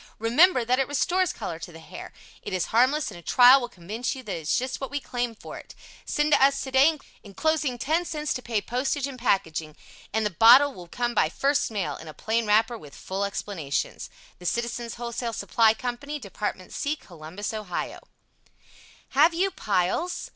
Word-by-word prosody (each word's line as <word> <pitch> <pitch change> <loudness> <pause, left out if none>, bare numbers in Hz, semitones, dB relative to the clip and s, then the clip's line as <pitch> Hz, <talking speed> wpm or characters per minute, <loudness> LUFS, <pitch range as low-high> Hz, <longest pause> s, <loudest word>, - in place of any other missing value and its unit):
Remember 250 - +4
that 250 +3 +2
it 270 - +1
restores 350 +6 +1
color 170 -7 -6
to 175 - -8
the 165 - -12
hair. 160 - -10 0.3
It - - -6
is 185 -2 0
harmless 260 +4 +3
and 175 - -10
a - - -13
trial 250 +8 +7
will 240 - -4
convince 220 +7 -4
you 260 - -9
that 210 - -4
it - - -4
is 150 - +1
just 255 +2 -3
what 270 - -4
we 285 - -2
claim 245 -3 -3
for - - -9
it. - - -14 0.3
Send 295 0 0
to - - +5
us 275 0 +4
today, 270 +4 +4 0.3
enclosing 280 +5 -1
10c 310 +2 -1
to 250 - -5
pay 230 -4 -1
postage 265 +4 -1
and 270 -2 -7
packing, 160 -9 -1 0.4
and 220 +1 0
the 210 - 0
bottle 245 +9 +7
will 180 -5 -11
come 240 +6 -2
by 155 -8 +2
first 280 - +1
mail 190 -10 -3
in 160 - -11
a 155 - -9
plain 225 0 -1
wrapper 225 +3 +2
with 145 -5 -13
full 190 +1 -4
explanations. 170 -6 -4 0.3
The 180 - -5
Citizens' 235 +1 -2
Wholesale 235 0 -4
Supply 220 +2 +3
Co. 245 +1 -3
Department 215 -9 -5
C. 295 +1 -1
Columbus, 175 - -8
Ohio 210 -5 -4 1.1
Have 335 +1 +4
You 380 +3 +1
Piles? 210 - -1
235 Hz, 190 wpm, -26 LUFS, 200-275 Hz, 1.1 s, trial